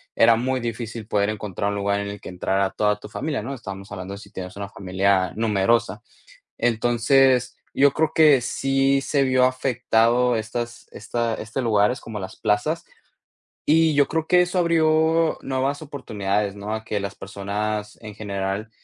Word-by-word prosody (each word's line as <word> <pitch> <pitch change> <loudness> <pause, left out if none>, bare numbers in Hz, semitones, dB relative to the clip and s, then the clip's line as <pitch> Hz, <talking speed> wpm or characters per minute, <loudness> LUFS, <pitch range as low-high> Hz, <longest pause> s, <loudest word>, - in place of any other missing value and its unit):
era 115 0 +6
muy 130 +1 -1
difícil 115 -1 -5
poder 100 -1 +1
encontrar 100 -1 -3
un - - -3
lugar 100 0 0
en 100 - -4
el 100 0 -7
que - - -8
entrara 95 +2 0
toda 105 -1 +1
tu - - -11
familia, 145 +3 -3
¿no? 135 +5 -4
estábamos 95 -5 -8
hablando 95 -1 -6
de - - -7
si 100 -1 -14
tienes 90 -1 -7
una 100 0 -6
familia 95 -1 0
numerosa. 110 -1 +1 0.6
Entonces, 120 +2 +2 0.2
yo 140 +1 +5
creo 155 +1 0
que 150 -4 +6
sí 135 +2 +1
se 140 0 +1
vio 130 -1 +3
afectado 125 -2 +2
estas 120 +2 -5
esta 120 -1 -2
este 110 +5 -4
lugares 110 +2 +2
como 110 -2 -7
las 95 0 -7
plazas. 110 +11 0 0.8
Y 160 0 +4
yo 145 -1 +4
creo 160 0 -2
que 180 0 +5
eso 180 +1 0
abrió 160 -1 +3
nuevas 135 +2 -2
oportunidades, 105 -8 -2
¿no? 105 +2 -5
A 110 - -4
que 105 - -2
las 100 -1 -5
personas 105 +2 -4
en 105 -2 -9
general, 100 0 -3
115 Hz, 170 wpm, -23 LUFS, 100-135 Hz, 0.8 s, era